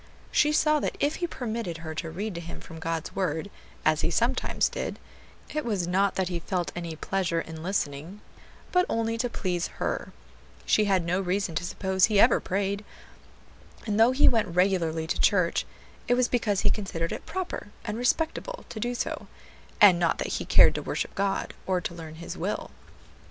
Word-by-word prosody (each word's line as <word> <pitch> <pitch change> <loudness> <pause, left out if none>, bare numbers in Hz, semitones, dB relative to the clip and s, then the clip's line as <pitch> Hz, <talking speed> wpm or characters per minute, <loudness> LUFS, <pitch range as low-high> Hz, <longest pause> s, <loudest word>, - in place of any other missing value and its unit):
She 300 - +4
saw 305 0 +3
that - - -2
if 290 +2 +1
he 350 - -1
permitted 230 - -4
her 160 -1 -6
to 160 +1 -4
read 200 +6 -4
to 170 - -5
him 170 0 -8
from 160 - -10
God's 165 -1 -3
word, 185 0 -1 0.3
as - - +3
he - - +1
sometimes - - +1
did, - - -4 0.6
it 305 0 -1
was 205 -7 0
not 195 +3 +2
that 190 -1 0
he 175 -1 -2
felt 175 0 -2
any 170 -2 -4
pleasure 175 0 -1
in 160 -1 -6
listening, 170 +1 -3 0.5
but 360 0 +3
only 225 0 0
to 245 +1 0
please 180 -6 -1
her; - - -2 0.5
she 215 - +4
had 190 -4 +2
no 180 +3 +1
reason 190 -1 -1
to 165 - -1
suppose 190 +1 +2
he 210 -2 +2
ever 235 +3 +6
prayed, 200 +2 -1 1.0
and 210 -1 0
though 230 +3 +7
he 260 +3 +5
went 225 -3 +4
regularly 175 -4 +2
to 160 - -2
church, 180 -4 +3 0.4
it 245 - +4
was 250 0 +3
because 215 -6 +1
he 205 - +3
considered 170 -5 -2
it - - -6
proper 350 - -4 0.2
and 220 0 -3
respectable 325 - -1
to 220 - -6
do 245 +3 -1
so, - - -3 0.5
and 190 -4 +8
not 170 -2 +2
that - - -3
he - - -2
cared - - +7
to - - -3
worship - - -3
God, 195 0 -1
or 185 -1 +2
to 175 - -4
learn 160 -2 -8
His 170 +1 -7
will. - - -3
195 Hz, 190 wpm, -27 LUFS, 170-225 Hz, 1.0 s, and